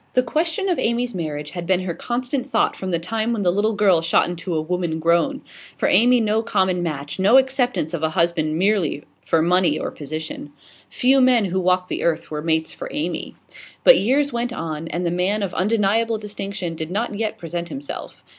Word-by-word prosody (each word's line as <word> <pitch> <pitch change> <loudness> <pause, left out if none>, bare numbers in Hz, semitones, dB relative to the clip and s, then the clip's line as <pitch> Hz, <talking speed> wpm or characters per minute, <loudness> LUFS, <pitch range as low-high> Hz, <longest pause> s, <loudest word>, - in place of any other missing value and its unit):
The 255 - +4
question 325 +9 0
of 360 - 0
Amy's 240 +1 0
marriage 150 -4 -4
had 175 -2 -6
been 185 0 +2
her 185 -2 -3
constant 255 - -3
thought - - +2
from 190 - -5
the 170 - +1
time 220 +7 -2
when 215 -3 -2
the 175 - +3
little 210 +4 0
girl 195 -5 +4
shot 165 0 +2
into 175 0 -4
a - - +1
woman 165 0 -2
grown. 170 - +1 0.4
For - - +1
Amy 245 +2 +5
no 220 0 +1
common 190 -5 0
match, 150 -1 -4
no 205 +7 +6
acceptance 255 - +1
of 170 - -3
a 160 - +1
husband 160 -1 0
merely 185 -6 +1 0.2
for 160 -1 +2
money 180 +1 +3
or - - -4
position. 155 0 -7 0.4
Few 265 +2 +3
men 250 -4 +4
who 190 0 -1
walked 180 0 +1
the - - -3
earth 165 -2 -1
were 150 -1 -3
mates 160 0 0
for - - -7
Amy. 165 +2 -3 0.5
But - - +8
years 280 +5 +1
went 240 +1 -1
on, 165 -6 -5
and 175 +2 -3
the 170 - 0
man 190 +4 0
of 185 -3 -3
undeniable 220 +3 +1
distinction 200 -4 -5
did 160 0 -5
not 210 +5 -2
yet 215 +1 -3
present 170 +1 -5
himself. 280 +1 -7
185 Hz, 200 wpm, -21 LUFS, 165-230 Hz, 0.5 s, But